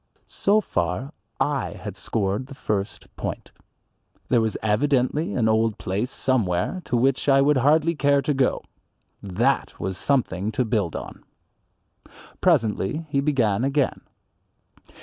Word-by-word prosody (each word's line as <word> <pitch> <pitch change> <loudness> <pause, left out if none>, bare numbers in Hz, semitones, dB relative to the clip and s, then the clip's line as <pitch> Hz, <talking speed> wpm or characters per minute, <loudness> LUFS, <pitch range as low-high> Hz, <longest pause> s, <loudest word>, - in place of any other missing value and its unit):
So 210 +2 +2
far 90 - -2 0.3
I 140 -4 0
had 105 -3 -7
scored 100 +3 -2
the 135 - -10
first 105 -4 -4
point. - - -5 0.8
There 120 -2 +4
was 110 -1 -1
evidently 140 - +1
an 115 -3 +2
old 110 -1 +2
place 100 +7 -2
somewhere 130 - 0
to 125 - 0
which 135 +3 +1
I 135 0 +6
would 140 +1 +4
hardly 155 +5 +3
care 140 -2 +2
to 150 - +1
go. 135 -1 +1 0.6
That 115 +8 0
was 95 0 -4
something 110 -7 0
to 125 +3 +1
build 105 -7 -1
on. - - -7 1.2
Presently 145 - +1
he 140 -1 +1
began 125 -7 +1
again. 140 0 0
125 Hz, 130 wpm, -24 LUFS, 105-140 Hz, 1.2 s, I